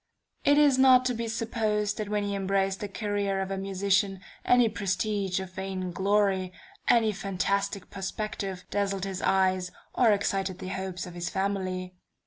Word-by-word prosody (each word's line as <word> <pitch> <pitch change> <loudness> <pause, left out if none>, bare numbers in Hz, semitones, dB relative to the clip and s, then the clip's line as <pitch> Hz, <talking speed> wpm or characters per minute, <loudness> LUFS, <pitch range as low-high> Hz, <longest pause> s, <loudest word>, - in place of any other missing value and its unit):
It 285 0 +5
is 285 -3 +5
not 255 -1 +7
to 250 - +1
be 230 0 -3
supposed 220 -2 -1
that 210 -1 -3
when 210 -1 0
he 200 0 -2
embraced 195 0 0
the 205 - -3
career 200 -1 -1
of 190 0 -3
a 195 - -2
musician, 195 0 +1 0.2
any 245 -1 +5
prestige 200 -1 -1
of 190 -1 -7
vain 190 -1 -4
glory, 195 0 +1 0.4
any 225 -3 +4
fantastic 195 0 -2
perspective, 195 -1 -4
dazzled 195 -2 -1
his 195 -1 -4
eyes, 185 -1 +2 0.2
or 235 -3 +4
excited 195 -2 0
the 185 - -6
hopes 190 -1 -4
of 180 - -9
his 175 0 -3
family. 185 -2 -2
195 Hz, 160 wpm, -28 LUFS, 190-210 Hz, 0.4 s, not